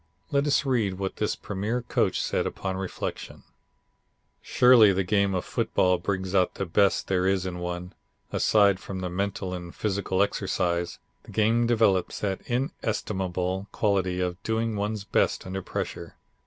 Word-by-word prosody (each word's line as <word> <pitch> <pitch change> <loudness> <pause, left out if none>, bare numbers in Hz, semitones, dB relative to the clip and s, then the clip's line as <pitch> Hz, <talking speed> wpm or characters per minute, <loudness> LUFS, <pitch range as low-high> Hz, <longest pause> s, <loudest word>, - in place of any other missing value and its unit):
Let 140 0 +2
us 140 0 +2
read 115 -8 +1
what 95 0 -4
this 105 - 0
premier 105 +5 -3
coach - - 0
says - - 0
upon 95 -1 -4
reflection: 95 -1 -5 1.0
"Surely 125 -5 +6
the 95 0 +1
game 100 0 +1
of 90 - -2
football 90 -1 +1
brings 95 -1 -2
out 90 -2 +2
the 95 - -2
best 100 +3 +2
there 95 -1 +1
is 95 -1 +1
in 90 -1 -4
one. 90 +1 -5 0.4
Aside 100 -3 +4
from 95 -1 -6
the 90 -1 -3
mental 95 0 -2
and 85 -1 -7
physical 100 -2 0
exercise, 85 -3 -1 0.3
the - - -12
game 115 +2 +2
develops 110 -6 +2
that 95 -2 -2
inestimable 95 - -2
quality 95 -4 0
of 90 +1 -2
doing 110 0 -1
one's 105 0 -2
best - - 0
under 95 +1 -4
pressure. - - -5
95 Hz, 155 wpm, -26 LUFS, 90-105 Hz, 1.0 s, Surely